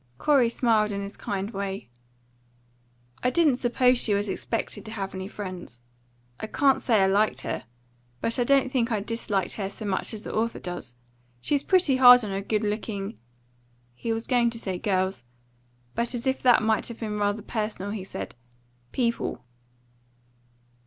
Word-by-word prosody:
Corey 265 - +4
smiled 225 -3 +2
in 200 0 -3
his 200 +1 -7
kind 200 +1 -3
way. 195 - -4 1.3
"I 250 - +2
didn't 290 -1 +3
suppose 250 0 +3
she 210 -4 +3
was 200 0 -1
expected 225 +4 -3
to 220 - -6
have 195 -3 -4
any 190 0 -5
friends. 185 - -7 0.6
I - - -4
can't 270 +4 +3
say 220 -5 +3
I - - +5
liked 205 +3 +2
her. - - -4 0.5
But 230 +3 -1
I - - +4
don't 270 0 +3
think 245 -2 +1
I 215 - +1
disliked 205 -3 -1
her 195 -2 -2
so 215 - -8
much 195 -2 -1
as 210 - -5
the - - -6
author 230 +1 0
does. 175 -9 -6 0.4
She's 280 - +1
pretty 360 -8 +3
hard 250 -1 +9
on 205 - -4
her 195 0 -2
good 210 +2 -1
looking" 210 0 -3 0.7
he 175 - -4
was 225 0 -2
going 240 -2 +3
to 230 - -6
say 190 -5 -4
girls, 190 - 0 0.7
but 235 +1 -1
as 235 - -3
if 265 0 0
that 245 -3 +5
might 220 -1 +1
have 235 - -8
been 210 -2 -3
rather 205 +1 0
personal, 210 -3 -3
he 210 -3 -4
said 195 - -6 0.6
"people." 235 - -1
215 Hz, 175 wpm, -26 LUFS, 200-240 Hz, 1.3 s, hard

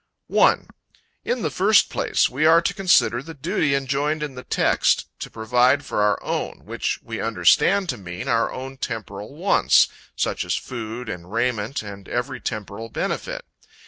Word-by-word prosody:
1. - - +3 0.6
In 245 -4 -2
the 155 - -1
first 200 +2 +4
place, - - +1
we 135 +5 -2
are 160 +1 +7
to 195 - -1
consider 175 - +3
the 165 +3 -10
duty 140 +1 0
enjoined 140 +3 -1
in 145 -2 -4
the 125 0 -9
text, - - +2
to - - -6
provide 125 +5 +2
for 105 - -1
our 105 0 +3
own: - - -3
which - - -2
we 115 -1 -5
understand 115 - +3
to 125 - -1
mean 90 -2 -7
our 115 -1 +1
own 135 +1 -7
temporal 110 0 -6
wants, 185 +6 +4 0.3
such - - -1
as - - -1
food 115 0 -6
and 90 -2 -7
raiment 115 +1 -1
and 100 -2 -10
every 120 0 -2
temporal 110 0 -5
benefit. - - -3
125 Hz, 165 wpm, -23 LUFS, 110-150 Hz, 0.6 s, are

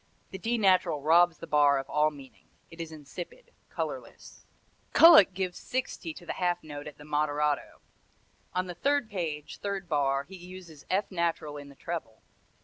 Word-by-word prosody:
The 190 - -6
D 235 +5 0
natural 185 -6 +3
robs 170 +1 +5
the - - -8
bar 145 -1 +4
of 135 0 -4
all 150 +1 +2
meaning. 135 -6 -15 0.2
It 165 0 -8
is 165 -1 -6
insipid, 160 - -9 0.2
colorless. - - -7 0.5
Kullak 320 - +8
gives 185 -1 -3
60 250 -9 -3
to 175 - -12
the - - -3
half 175 -1 -1
note 145 -1 -8
at 150 - -10
the 150 - -12
moderato. 150 0 -1 0.7
On 185 0 +1
the 180 - -6
third 280 +4 0
page, 160 -6 -4
third 200 -2 -4
bar, 140 -3 +1
he 190 +7 -12
uses 180 -4 -12
F 195 +3 0
natural 170 -4 -1
in 145 -1 -9
the 140 - -15
treble. 160 -9 -6
165 Hz, 170 wpm, -29 LUFS, 150-185 Hz, 0.7 s, Kullak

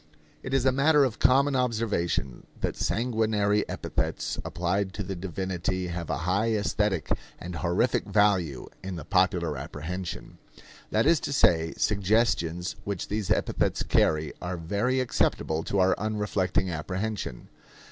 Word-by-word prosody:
It 135 - -6
is 135 -1 +2
a 130 - +5
matter 145 +3 +4
of 125 -5 -1
common 140 +2 +4
observation 110 - -1
that - - -1
sanguinary 110 -3 +1
epithets - - -2
applied 95 +3 -1
to 105 - -3
the 95 0 -4
divinity 95 0 -3
have 85 -1 -5
a - - 0
high 100 +5 +2
aesthetic 105 -3 0 0.3
and 85 -1 -6
honorific 90 +8 +1
value 95 -10 +2 0.2
in 95 -1 -4
the 80 - -7
popular 90 -4 +2
apprehension. 80 +5 -6 0.5
That - - +2
is 165 0 +5
to - - -4
say, 80 -11 +3
suggestions 100 -4 +1
which 100 -3 -4
these 105 -2 -2
epithets - - +1
carry 75 -1 +2
are 90 0 -3
very 105 +10 0
acceptable 80 -9 0
to 100 - -1
our 95 -1 +4
unreflecting 100 -3 0
apprehension. 95 - -4
95 Hz, 135 wpm, -27 LUFS, 85-110 Hz, 0.5 s, a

